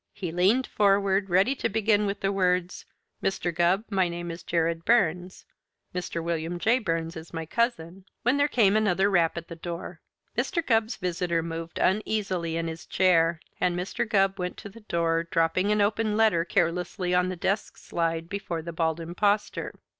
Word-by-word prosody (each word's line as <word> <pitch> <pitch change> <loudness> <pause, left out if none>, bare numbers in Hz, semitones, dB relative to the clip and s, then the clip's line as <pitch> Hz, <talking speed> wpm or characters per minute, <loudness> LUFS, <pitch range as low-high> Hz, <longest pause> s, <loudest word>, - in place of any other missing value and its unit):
He 185 -5 -5
leaned 195 +10 +3
forward, 200 -1 +2
ready 190 +9 +3
to 275 - -2
begin 210 -1 +2
with 200 0 -3
the 195 - +1
words, 180 -2 0 0.3
"Mr. 180 -2 -1
Gubb, 175 +5 +2
my 190 -3 +2
name 175 0 -5
is 165 - -8
Jared 165 -1 -1
Burns. 180 -5 +1 0.5
Mr. 180 -2 -3
William 170 +1 -2
J. 225 +8 +2
Burns 165 -5 -2
is 160 +1 -9
my 165 0 -3
cousin 190 -3 -2
" - - -53
when 250 +4 +3
there 285 0 +3
came 215 -8 +3
another 200 -2 +2
rap 170 -3 +2
at 170 - -6
the 170 - -8
door. 170 +1 -7 0.3
Mr. 335 -3 -1
Gubb's 225 -1 +2
visitor 175 -2 -1
moved 165 0 -6
uneasily 190 -4 0
in 165 0 -2
his 160 0 -7
chair, 170 -3 +3 0.2
and 175 -1 +1
Mr. 185 +5 -3
Gubb 195 -1 +2
went 180 0 -3
to 205 - -9
the 220 +4 -13
door, 165 -5 0
dropping 175 +5 +1
an 210 0 +2
open 210 +1 +1
letter 215 -7 +4
carelessly 180 +2 0
on 180 0 +3
the 185 - -3
desk 195 +4 -2
slide 165 -1 -2
before 175 -4 -4
the 170 0 -6
Bald 160 0 0
Impostor. 200 +5 -1
180 Hz, 180 wpm, -27 LUFS, 170-205 Hz, 0.5 s, letter